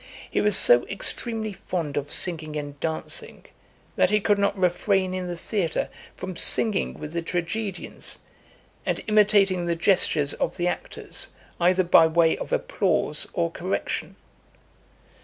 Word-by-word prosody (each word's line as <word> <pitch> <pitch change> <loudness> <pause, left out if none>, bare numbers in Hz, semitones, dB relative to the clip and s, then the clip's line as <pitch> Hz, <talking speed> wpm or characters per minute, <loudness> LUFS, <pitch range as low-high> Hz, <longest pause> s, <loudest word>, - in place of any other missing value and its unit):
He - - +1
was 210 -2 +3
so 120 0 +6
extremely 220 +1 -2
fond 170 -5 -4
of 145 0 -3
singing 155 -4 -1
and 145 -1 -5
dancing, 160 0 -4 0.5
that - - +3
he 210 +1 +3
could 205 0 +2
not 200 0 +1
refrain 185 +1 +1
in 185 -1 -3
the 175 -1 -4
theatre 175 -3 -1 0.3
from 185 -1 -6
singing 215 +2 0
with 150 +1 -8
the 170 - -1
tragedians, 180 +3 -3 0.7
and - - -2
imitating 200 -4 +4
the 170 - +1
gestures 165 -5 +2
of - - -2
the 175 -1 0
actors, - - -4 0.3
either 180 +2 +4
by 170 -2 +6
way 165 0 +3
of - - -7
applause - - 0
or 85 - 0
correction. - - -3
180 Hz, 140 wpm, -25 LUFS, 165-200 Hz, 0.7 s, so